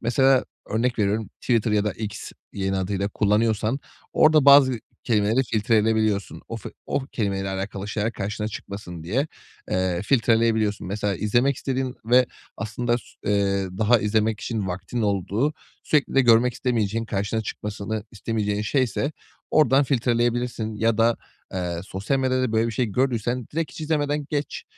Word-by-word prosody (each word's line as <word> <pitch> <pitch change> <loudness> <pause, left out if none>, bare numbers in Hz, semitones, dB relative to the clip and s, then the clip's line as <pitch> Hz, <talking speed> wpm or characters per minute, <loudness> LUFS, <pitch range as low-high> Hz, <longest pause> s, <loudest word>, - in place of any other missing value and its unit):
Mesela, 130 +3 +3 0.3
örnek 115 +3 0
veriyorum, 105 0 0
Twitter 115 -3 +1
ya 105 -1 +2
da 105 - 0
X 105 -1 -6 0.2
-yeni 95 0 -1
adıyla 95 +1 -1
kullanıyorsan 110 +4 +1 0.3
orada 155 -2 +5
bazı 140 -4 +7 0.3
kelimeleri 110 +2 +2
filtre 110 -1 +1
edeyebiliyorsun. 110 -2 +1
O - - -4
fi - - -8 0.2
o - - 0
kelimeyle 100 -3 -1
alakalı 95 +1 -4
şeyler 105 +1 -1
karşına 105 +1 -3
çıkmasın 100 -5 -8
diye, 130 - 0 0.4
eee, 90 -1 0
filtreleyebiliyorsun. 110 -3 +2
Mesela, 100 +1 -1
izlemek 120 +8 +2
istediğin 130 -1 -2
ve 125 +2 +5 0.3
aslında 120 +2 -1
s - - -16 0.2
eee, 100 -1 +1
daha 110 +2 +4
izlemek 110 +1 +1
için 110 -5 -2
vaktin 95 +6 -3
olduğu, 100 +8 0 0.3
sürekli 150 -3 +1
de 135 - +6
görmek 120 0 +5
istemeyeceğin, 115 -3 0
karşına 105 +1 -1
çıkmasını 105 0 -4
istemeyeceğin 105 -1 -2
şeyse 130 +5 0 0.4
oradan 140 -2 +4
filtreleyebilirsin 120 -3 0
ya 110 +1 +1
da, 115 +1 +4 0.4
eee, 90 -2 -2
sosyal 100 +8 -2
medyada 130 -2 +1
böyle 110 +1 +2
bir 115 - -3
şey 120 +3 0
gördüysen 120 +1 -1
direkt 165 0 -2
hiç - - -9
izlemeden 150 -2 0
geç. 145 -2 -3
110 Hz, 150 wpm, -24 LUFS, 100-125 Hz, 0.4 s, bazı